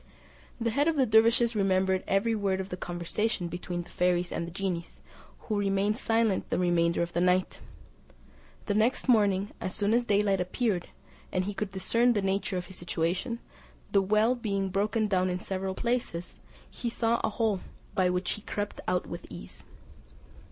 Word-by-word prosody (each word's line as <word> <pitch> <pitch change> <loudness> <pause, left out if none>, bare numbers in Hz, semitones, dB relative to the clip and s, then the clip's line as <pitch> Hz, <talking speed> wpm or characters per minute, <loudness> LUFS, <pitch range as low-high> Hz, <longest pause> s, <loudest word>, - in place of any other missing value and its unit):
The 230 -1 0
head 285 +6 +2
of 330 - +2
the 270 -3 +4
dervises 230 +1 +4
remembered 190 -2 +2
every 195 +4 +2
word 200 -3 0
of 190 0 -4
the 180 - -3
conversation 175 +2 -2
between 175 0 -4
the 175 - -17
fairies 180 0 +1
and 170 - -3
the - - -7
genies, 180 -2 -4 0.4
who 215 -2 -1
remained 200 +1 +1
silent 225 -4 +1
the - - 0
remainder 170 -1 +2
of 170 - -5
the 170 - +1
night. 180 +1 +2 1.1
The 205 - 0
next 225 +7 +1
morning, 205 -4 +3
as 185 - -3
soon 205 +1 +1
as 240 +1 +3
daylight 205 -4 +2
appeared, 185 0 -1 0.4
and 185 0 0
he 205 - -3
could 200 0 -3
discern 230 +6 +2
the 205 - +1
nature 195 0 0
of 180 - -3
his 190 - -12
situation, 175 +7 -1 0.5
the 200 - +4
well 215 +5 +3
being 200 -5 -1
broken 210 +3 +1
down 185 -2 +2
in 180 0 -2
several 190 0 -3
places, 235 -8 -2 0.3
he 240 - -4
saw 230 0 +1
a - - +2
hole, 215 -3 0 0.3
by 185 -1 +3
which 180 0 0
he 210 - -4
crept 205 0 -4
out 180 0 +1
with - - -7
ease. - - -10
195 Hz, 180 wpm, -29 LUFS, 180-220 Hz, 1.1 s, the